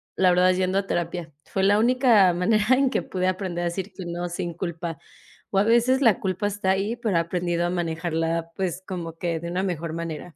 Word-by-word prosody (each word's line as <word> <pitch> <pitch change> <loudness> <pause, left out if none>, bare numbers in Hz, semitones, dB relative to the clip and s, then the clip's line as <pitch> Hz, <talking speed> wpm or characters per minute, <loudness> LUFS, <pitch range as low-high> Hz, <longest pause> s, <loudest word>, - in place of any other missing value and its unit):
la 185 -1 +4
verdad, 180 +1 +4
es 180 - -1
yendo 185 +1 +1
a 200 - 0
terapia, 170 -3 -3
fue 190 - -2
la 205 +2 +4
única 235 -5 +5
manera 215 +6 +3
en 270 0 +2
que - - 0
pude 185 -1 -2
aprender 185 -2 -2
a - - -1
decir 185 +3 -3
que 185 - -8
no 175 +1 -4
sin 175 -1 -4
culpa, 170 -2 -5 0.5
o 195 - -1
a 195 - +5
veces 240 +4 +3
la 225 -6 +4
culpa 190 +1 -2
está 205 -2 -1
ahí, 200 +4 0
pero, 225 -7 0
he - - +4
aprendido 175 0 -1
a 175 - -1
manejarla, 165 -1 -2
pues 185 -1 -3
como 175 -4 -5
que 170 -1 -2
de 170 +1 -6
una 180 +2 -1
mejor 170 -4 -3
manera. 165 0 -6
180 Hz, 225 wpm, -24 LUFS, 170-195 Hz, 0.5 s, única